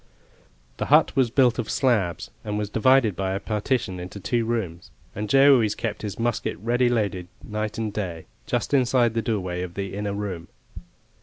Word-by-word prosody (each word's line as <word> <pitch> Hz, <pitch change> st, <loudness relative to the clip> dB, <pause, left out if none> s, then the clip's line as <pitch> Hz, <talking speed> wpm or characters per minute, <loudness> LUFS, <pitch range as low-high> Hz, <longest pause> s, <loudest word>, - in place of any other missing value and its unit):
The -, -, -2 dB
hut -, -, +4 dB
was 130 Hz, -3 st, +3 dB
built 125 Hz, 0 st, +3 dB
of 115 Hz, -, -3 dB
slabs, 105 Hz, -, 0 dB
and 105 Hz, 0 st, -3 dB
was 105 Hz, -1 st, -3 dB
divided 120 Hz, -3 st, +4 dB
by 95 Hz, 0 st, -2 dB
a 95 Hz, -, -2 dB
partition 105 Hz, -2 st, -2 dB
into 90 Hz, +3 st, -7 dB
two 115 Hz, +4 st, 0 dB
rooms, 100 Hz, -8 st, -3 dB, 0.2 s
and 105 Hz, +1 st, -4 dB
Joe 140 Hz, +1 st, +7 dB
always 110 Hz, -5 st, +2 dB
kept 110 Hz, -3 st, -4 dB
his 105 Hz, -2 st, -5 dB
musket 115 Hz, -1 st, -1 dB
ready 120 Hz, +2 st, +1 dB
loaded, 100 Hz, -7 st, -1 dB, 0.2 s
night 105 Hz, 0 st, -4 dB
and 110 Hz, -2 st, -3 dB
day, 90 Hz, -6 st, -4 dB, 0.2 s
just -, -, -1 dB
inside 125 Hz, -3 st, +3 dB
the 115 Hz, -, 0 dB
doorway 95 Hz, -6 st, -2 dB
of 90 Hz, -1 st, -6 dB
the 100 Hz, -1 st, -4 dB
inner 100 Hz, 0 st, -3 dB
room. 95 Hz, -5 st, -5 dB
105 Hz, 180 wpm, -24 LUFS, 95-120 Hz, 0.2 s, Joe